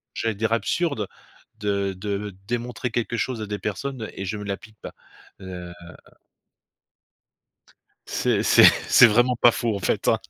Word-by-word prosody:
j'allais 115 -2 -1
dire 115 +2 -1
absurde 115 - -1 0.5
de 100 -2 -1
de 100 0 -5
démontrer 120 +1 -3
quelque 120 0 -2
chose 125 -4 -2
à - - -3
des 105 0 -4
personnes 110 +3 -4
et 95 - -6
je 105 +3 -3
me 105 - -7
l'applique 105 +2 -7
pas. - - -8 0.5
Heu 90 -2 -8 2.4
C'est - - 0
c'est - - +6 0.3
c'est 120 - +8
vraiment 120 +3 +3
pas 120 0 +5
faux, 115 -2 -2
en 100 - -4
fait, - - -1
hein? - - +3
110 Hz, 150 wpm, -24 LUFS, 100-120 Hz, 2.4 s, c'est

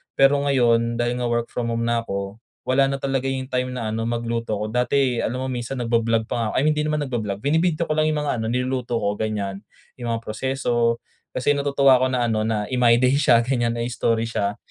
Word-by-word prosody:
pero 135 +1 +5
ngayon 120 -3 +2
dahil 120 +1 0
nga 120 - 0
work 120 0 -1
from-home 115 -1 -2
na 120 0 +1
ako, 100 +1 -5 0.2
wala 135 +1 +3
na 140 - -1
talaga 135 -1 -1
yung 130 -1 -2
time 125 0 0
na 115 -3 -3
ano 115 +1 -2
magluto 115 -1 -2
ko. 105 - -3
Dati 125 +1 +1
alam 120 - -2
mo - - -3
minsan 120 +1 -4
nagba-vlog 115 -1 +1
pa 115 -3 -1
nga - - 0
I - - +1
mean 155 - +4
hindi 150 0 0
naman 150 -1 0
nagba-vlog, 110 -6 -3
bini-video 160 +3 +1
ko - - -3
lang 155 0 +3
yung 150 -1 -1
mga 140 -5 -1
ano 110 - -2
niluluto 125 -1 -1
ko 100 -1 -1
ganyan. 100 -3 -2 0.4
Yung 120 -1 -3
mga 115 - -6
proseso, 120 0 0 0.4
kasi 130 +3 +2
natutuwa 140 -2 +4
ako 130 - +3
na 125 - +1
ano 110 -1 0
na 110 -2 0
i-my 125 -2 +4
day 125 +2 +3
siya 120 -5 +5
ganyan 120 -2 0
na 115 - -2
i-story 115 -1 0
siya. 100 -2 -1
120 Hz, 220 wpm, -23 LUFS, 115-135 Hz, 0.4 s, pero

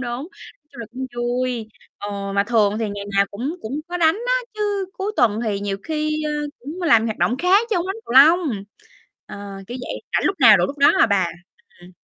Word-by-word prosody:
Nói 245 +3 -4 0.5
chung 260 - -10
là 230 - -6
cũng 260 +1 -5
vui. 240 -1 -2 0.3
Ờ, 200 -1 -5
mà 200 0 +2
thường 215 -2 +2
thì 225 - -1
ngày 200 0 -6
nào 200 - +5
cũng 265 - -4
cũng 270 +7 -4
có 355 - -3
đánh 325 -1 +3
á, - - +1 0.2
chứ 410 -2 -1
cuối 400 +2 -4
tuần 220 -2 +2
thì 205 -3 -2
nhiều 200 -1 -2
khi, 305 -1 -2
ơ, 305 - -2 0.3
cũng 310 +9 -8
làm 230 -9 +4
hoạt 220 -2 -3
động 245 - +1
khác 385 +7 +3
chớ 400 - +2
hông 345 - -1
đánh 385 +2 -3
cầu - - -6
lông. 280 - +5 0.6
Ờ, - - -9 0.3
kiểu 245 +5 -6
vậy. - - -6
Rảnh - - +1
lúc 390 - 0
nào 220 -5 +8
rủ 175 - +1
lúc 280 +6 -8
đó 280 - +6
à - - +6
bà. 195 -4 +2 0.5
Ừm. 175 +1 -14
245 Hz, 225 wpm, -21 LUFS, 210-320 Hz, 0.6 s, nào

